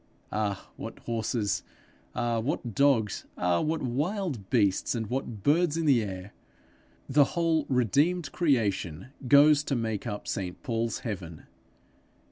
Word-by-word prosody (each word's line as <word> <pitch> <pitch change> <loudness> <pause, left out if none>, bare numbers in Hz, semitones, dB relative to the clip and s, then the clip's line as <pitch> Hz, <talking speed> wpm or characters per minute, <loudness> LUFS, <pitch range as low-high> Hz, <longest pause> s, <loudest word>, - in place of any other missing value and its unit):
Ah, 105 -2 -2
what - - -7
horses! 115 -2 -1 0.5
Ah, 120 -1 0
what 120 -1 -2
dogs! 115 -5 +2
Ah, 90 -1 +2
what 160 0 -1
wild 145 - -2
beasts, 105 -2 +2
and 115 -1 -2
what 120 -6 -3
birds 165 +2 +3
in 165 - 0
the 135 -6 +5
air! 95 -1 -6 0.7
The 145 +2 +5
whole 165 -3 +2
redeemed 145 - +2
creation 105 - 0 0.2
goes 145 +2 +6
to 140 - 0
make 110 -3 -2
up 105 - -5
St 95 -4 -4
Paul's 115 -3 -1
heaven. 90 -8 -6
120 Hz, 130 wpm, -28 LUFS, 105-145 Hz, 0.7 s, goes